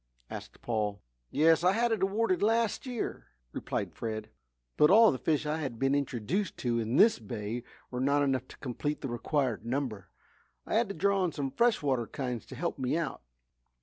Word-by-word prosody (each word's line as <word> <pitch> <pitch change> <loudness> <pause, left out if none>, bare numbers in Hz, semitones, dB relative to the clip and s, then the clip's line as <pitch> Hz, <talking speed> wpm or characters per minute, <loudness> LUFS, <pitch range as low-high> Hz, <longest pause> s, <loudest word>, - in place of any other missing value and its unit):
asked - - -9
Paul. 105 -4 -1 0.3
"Yes, 160 +2 +4
I 180 +1 +5
had 235 +2 +2
it 220 -4 0
awarded 195 -1 +1
last 225 +3 +1
year," 245 -3 -4 0.2
replied - - -3
Fred. 110 -1 -5 0.4
"But 150 - +5
all 220 +3 +8
the 130 - -3
fish 155 -2 +1
I 150 +1 0
have 135 -7 -4
been 135 +3 +2
introduced 140 - -1
to 120 -1 +2
in 115 +2 -1
this 220 - +6
bay 110 +1 -4 0.3
were 125 0 -3
not 140 +2 +3
enough 130 -2 0
to - - -13
complete 145 +3 -3
the 135 - -3
required 120 0 -1
number. 120 -5 -3 0.6
I - - -4
had 225 0 +2
to 200 - -4
draw 200 0 +2
on 180 -3 0
some 140 -3 -3
fresh 235 - +2
water 130 -5 +1
kinds 125 -4 -4
to 130 - -9
help 165 +2 -3
me 130 +4 0
out." 170 - -3
140 Hz, 190 wpm, -30 LUFS, 120-190 Hz, 0.6 s, all